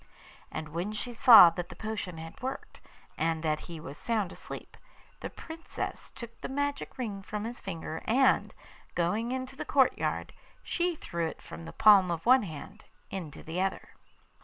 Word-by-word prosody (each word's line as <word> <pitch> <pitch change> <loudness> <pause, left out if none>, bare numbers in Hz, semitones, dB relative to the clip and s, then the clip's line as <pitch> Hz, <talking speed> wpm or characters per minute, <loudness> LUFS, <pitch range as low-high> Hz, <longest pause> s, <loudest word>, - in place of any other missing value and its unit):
And 155 0 -5
when 175 +7 -3
she 240 +3 -4
saw 225 -7 +10
that 175 +1 -5
the 180 - -9
potion 210 -4 -4
had 165 0 -9
worked, 265 +1 -6 0.4
and 160 0 0
that 155 -1 +1
he 165 -2 -6
was 145 -2 -9
sound 215 -6 0
asleep, - - -9 0.4
the - - -5
Princess 330 0 -6
took 235 -1 -10
the - - -4
magic 285 +1 -2
ring 210 -6 -4
from 210 +2 -5
his 235 +2 -5
finger, 160 -3 -5
and, 260 +4 +3 0.4
going 205 +8 0
into 260 +1 -4
the - - -4
courtyard, 270 -2 +1 0.3
she 350 -1 0
threw 170 - -3
it - - -7
from 165 - -10
the - - -7
palm 200 -4 +7
of 165 -1 -3
one 255 +2 +7
hand 190 +4 -8 0.3
into 170 -7 -6
the 165 +3 -3
other. 190 0 -2
200 Hz, 170 wpm, -30 LUFS, 165-245 Hz, 0.4 s, saw